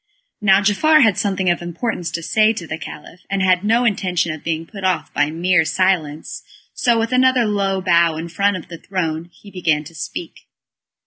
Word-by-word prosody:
Now 195 -1 +5
Giafar 300 +9 +4
had 220 -5 +3
something 190 -1 -1
of 175 - -2
importance 175 +1 -3
to 165 +1 -5
say 215 +5 +3
to 185 -6 -7
the 160 0 -6
Caliph, 160 +2 -10
and 195 -1 0
had 185 0 +3
no 230 +4 +2
intention 180 -6 0
of 155 - -10
being 165 0 -2
put 195 +1 -10
off 185 -2 -1
by 145 0 +1
mere 175 +2 +2
silence, 160 -4 -1 0.3
so 235 -2 +2
with 225 +1 -1
another 255 -1 +3
low 195 -2 0
bow 170 -3 +3
in 165 +1 -5
front 200 +3 0
of 165 - -10
the 170 -2 -9
throne, 165 -4 -3
he 200 +3 -16
began 160 -5 0
to 155 - -12
speak. 150 - -7
185 Hz, 195 wpm, -19 LUFS, 165-205 Hz, 0.3 s, Now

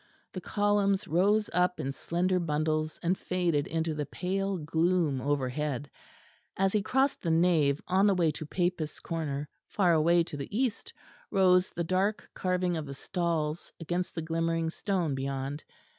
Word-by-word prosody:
The 185 - -5
columns 205 0 +1
rose 205 +6 +3
up 180 +1 +2
in 135 - -2
slender 180 +6 0
bundles 155 -1 -1
and 175 +2 +2
faded 175 -6 0
into 160 0 -1
the 150 -1 -3
pale 195 +1 -2
gloom 160 -2 +1
overhead; 145 0 -2 0.7
as 195 0 +2
he 210 - +2
crossed 265 +6 +1
the 170 - -2
nave 160 -4 +3
on 190 +3 +4
the 200 - +4
way 170 -3 +3
to 155 - -7
Papists' 175 -3 -1
Corner 150 -4 -3 0.2
far 180 -4 +2
away 170 +2 +4
to 165 - -8
the 145 +9 -5
east 250 -3 -1 0.4
rose 185 -1 +4
the 170 - -3
dark 190 +5 0
carving 180 -1 0
of 155 -2 -5
the 140 - -6
stalls 165 -1 -2
against 175 +2 -3
the 165 - -3
glimmering 165 0 0
stone 180 -6 -1
beyond. 135 +2 -3
170 Hz, 160 wpm, -29 LUFS, 155-185 Hz, 0.7 s, on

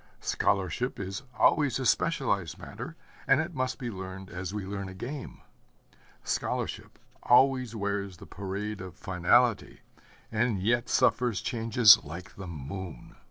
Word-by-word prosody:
Scholarship 100 +6 0
is 95 +3 -4 0.2
always 145 -4 +4
a 130 - -3
specialized 115 - +1
matter, - - -8 0.3
and 135 - +5
it 165 +3 -2
must 130 -3 -1
be 125 -4 -4
learned 95 0 -8
as 90 -2 -5
we 105 -2 -4
learn 100 0 -5
a 95 - -9
game. 130 +8 -7 0.8
Scholarship - - -3 0.2
always 130 -2 +4
wears 100 -3 -2
the - - -12
parade 100 +1 -5
of 95 -1 -8
finality, 95 +6 +2 0.5
and 115 -2 +1
yet 120 +5 +1
suffers 120 -4 +2
changes 115 -3 +6
like 85 +5 -9
the 95 -1 -8
moon. 85 +3 -7
105 Hz, 135 wpm, -29 LUFS, 95-125 Hz, 0.8 s, changes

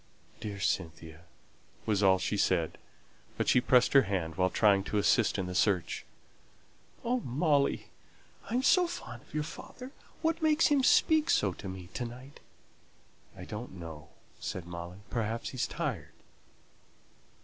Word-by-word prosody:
"Dear 100 -2 -5
Cynthia," 80 -3 -3 0.6
was 105 -2 +1
all 95 -2 +5
she 100 - -2
said; 90 -5 +1 0.6
but - - -1
she 125 - +5
pressed 125 0 +4
her 135 - +8
hand 95 -6 -2
while 95 +1 +2
trying 100 -1 +3
to 105 - -1
assist 105 +2 +3
in 95 - -1
the 90 - -5
search. 90 -3 +1 1.0
"Oh, 245 +2 +1
Molly, 145 - +1 0.6
I 230 - -1
am 255 - +1
so 355 +6 +5
fond 120 - -7
of - - -15
your 150 - 0
father; 250 - -9 0.3
what 325 +1 +1
makes 315 +1 +4
him 290 -2 +4
speak 315 +3 +4
so 100 -3 +3
to 95 +2 -8
me 95 -2 -8
to 120 - -3
night?" 125 +4 -10 1.0
"I - - -8
don't 105 +2 -7
know," 80 -3 -9 0.3
said 90 -2 -5
Molly; 85 +2 -8
"perhaps 115 -1 -2
he's 130 - -2
tired." 140 - -4
105 Hz, 150 wpm, -31 LUFS, 90-145 Hz, 1.0 s, her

